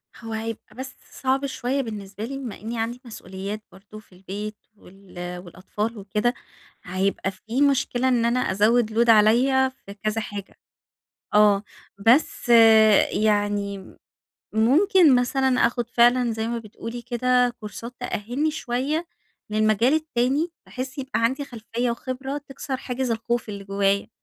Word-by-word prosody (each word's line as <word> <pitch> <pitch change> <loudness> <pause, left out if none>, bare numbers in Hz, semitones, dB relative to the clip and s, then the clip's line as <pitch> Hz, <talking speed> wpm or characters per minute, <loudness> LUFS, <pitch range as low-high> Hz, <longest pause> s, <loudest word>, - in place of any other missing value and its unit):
هو 225 0 -8
هيبقى 225 0 -6
بس 265 +1 -7 0.2
صعب 270 +1 0
شوية 270 0 -1
بالنسبة 210 -4 -7
لي، 270 +3 -5
بما 255 -6 -7
إنّي 225 +2 -4
عندي 235 +2 -3
مسئوليات 200 -1 -7
برضه 200 +3 -13
في 215 - -22
البيت 200 +3 -6 0.2
وال 180 -2 -9
والأطفال 205 +6 -5
وكده، 210 +4 -1 0.5
هيبقى 190 +1 -1
فيه 225 +7 -4
مشكلة 270 -3 +2
إن 245 -3 +2
أنا 240 +2 +2
أزَّود 220 +1 +2
load - - 0
عليّا 245 +5 +5
في 255 -6 -13
كذا 215 +2 -2
حاجة. 205 -2 -8 0.8
آه. 210 -1 +5 0.4
بس 235 +6 +3 0.6
يعني 205 -2 -1 0.6
ممكن 305 - +5
مثلًا 260 +2 +2 0.2
آخُد 240 0 -3
فعلًا 240 0 +4
زي 220 0 -3
ما 235 0 -2
بتقولي 230 +2 -8
كده، 250 +1 +2
كورسات 230 +3 -8
تأهّلني 245 +5 -2
شوية 295 +4 -2 0.4
للمجال 215 +5 +3
التاني 305 +1 0 0.2
بحيث 255 +2 -6
يبقى 265 -2 -2
عندي 265 +5 0
خلفية 240 -1 -3
وخبرة، 260 +4 -4
تِكسَر 270 -1 -6
حاجز 255 -1 -3
الخوف 230 +1 -1
اللي 200 -1 -6
جوّايا. 200 +1 0
235 Hz, 135 wpm, -24 LUFS, 210-255 Hz, 0.8 s, عليّا